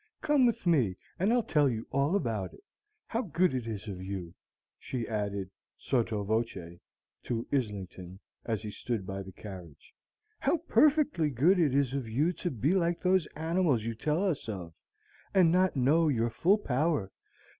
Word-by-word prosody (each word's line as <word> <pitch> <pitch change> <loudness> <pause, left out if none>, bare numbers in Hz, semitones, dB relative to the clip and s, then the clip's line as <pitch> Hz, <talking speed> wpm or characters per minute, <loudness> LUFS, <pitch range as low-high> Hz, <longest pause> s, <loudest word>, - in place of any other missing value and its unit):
Come 295 -5 +4
with 230 -3 -1
me, 130 - +2 0.2
and 195 +5 +2
I'll 240 -1 +3
tell 150 -7 +3
you 115 -2 -3
all 140 +6 +1
about 110 - -2
it. - - -20 0.4
How 230 - -1
good 180 - +1
it 125 -3 -3
is 110 -1 -5
of 95 -3 -6
you," 95 -3 -5 0.5
she 125 -3 -4
added, 100 -3 -3 0.3
sotto 115 -5 0
voce, 100 -6 -2 0.4
to 115 -1 -3
Islington, 95 -7 -3 0.2
as 110 -2 -2
he 105 - -5
stood 105 0 -3
by 95 +1 -4
the 95 0 -9
carriage, 90 -7 -11 0.5
"how - - +2
perfectly 300 - +3
good 155 +9 +3
it 145 -6 +3
is 140 -2 +2
of 135 -5 -3
you 150 +10 +1
to 180 - -3
be 135 - 0
like 170 -2 +1
those 185 -2 +3
animals 160 -6 +1
you 115 +1 -2
tell 150 - 0
us 150 -10 -2
of, 90 -6 -6 0.6
and 180 -4 +6
not 185 0 +3
know 145 +6 +3
your 120 -5 +1
full 185 - +3
power. 145 - 0
130 Hz, 170 wpm, -30 LUFS, 105-170 Hz, 0.6 s, and